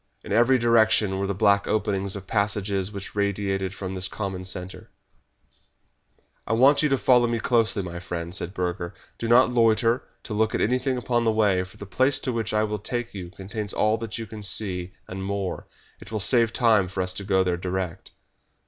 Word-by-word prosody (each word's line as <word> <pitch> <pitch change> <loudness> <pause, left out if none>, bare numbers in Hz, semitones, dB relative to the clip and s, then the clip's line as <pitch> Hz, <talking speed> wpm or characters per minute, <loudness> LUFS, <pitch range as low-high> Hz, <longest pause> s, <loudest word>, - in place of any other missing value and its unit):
In - - -9
every 120 +5 +4
direction 110 -4 +3
were 100 - -1
the 100 - -2
black 100 0 +3
openings 100 -2 -1
of 100 -1 -7
passages 100 -1 -1
which 100 -2 -7
radiated 100 -1 -1
from 95 -1 -5
this 95 0 -2
common 95 -3 -5
centre. 95 0 -6 1.6
"I 115 - 0
want 135 +5 +5
you 150 - +2
to 135 - +2
follow 125 -2 +4
me 115 -1 -1
closely, 115 -4 +2
my 85 -1 -6
friend," 85 -1 -5
said 90 -1 -2
Burger. 90 -1 -3 0.2
"Do 115 - -2
not 120 +2 +5
loiter 115 +1 +3 0.2
to 110 - -5
look 110 +1 +1
at - - 0
anything 125 +3 +1
upon 120 -1 0
the 115 - +3
way, 105 -4 +2
for 90 - -16
the 100 - -8
place 130 +8 +2
to 130 - -2
which 115 -1 -2
I 105 0 +2
will 105 -1 -2
take 120 +3 -4
you 90 -3 -7
contains 100 +3 -5
all 110 +1 +1
that 115 0 -5
you 115 - -5
can 110 -1 -9
see, 95 -3 -2
and 95 +1 -6
more. 100 -1 -3 0.3
It - - -11
will 110 - -2
save 115 +2 +3
time 110 -6 +3
for 95 +1 -2
us 90 0 -1
to 100 - -5
go 95 -1 +2
there 90 -1 0
direct." 90 0 -4
105 Hz, 200 wpm, -25 LUFS, 95-115 Hz, 1.6 s, want